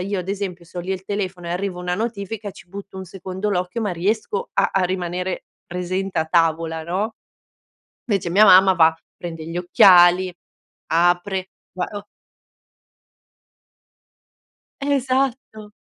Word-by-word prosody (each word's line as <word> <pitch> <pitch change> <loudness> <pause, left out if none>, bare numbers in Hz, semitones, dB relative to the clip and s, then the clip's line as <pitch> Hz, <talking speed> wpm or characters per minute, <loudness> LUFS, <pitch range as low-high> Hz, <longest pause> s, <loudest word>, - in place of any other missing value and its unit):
io 200 +1 -2
ad 180 0 -6
esempio 190 -3 -4
se 170 - -16
ho - - -1
lì 180 +2 -6
il 190 -1 -3
telefono 190 -3 -4
e - - -4
arriva 180 +1 -3
una 180 0 -2
notifica, 215 0 -4
ci 175 - -16
butto 195 +1 -9
un 190 - -6
secondo 190 +2 -5
l'occhio 180 +4 -2
ma 205 -4 -1
riesco 220 - -2
a - - +2
a 195 - +2
rimanere 180 0 -3 0.2
presente 185 +1 -3
a 160 - +2
tavola, 165 -1 +1
no? 195 +7 -2 0.9
Invece 195 -6 -1
mia 200 +5 +6
mamma 190 -1 +7
va, 160 -2 +4 0.2
prende 165 -2 -7
gli 165 +2 -5
occhiali, 180 -1 +6 0.5
apre, 175 +3 +1 0.2
va 180 0 -2
o 205 -1 -7 2.8
Esatto! 260 -5 -1
185 Hz, 140 wpm, -21 LUFS, 175-205 Hz, 2.8 s, mamma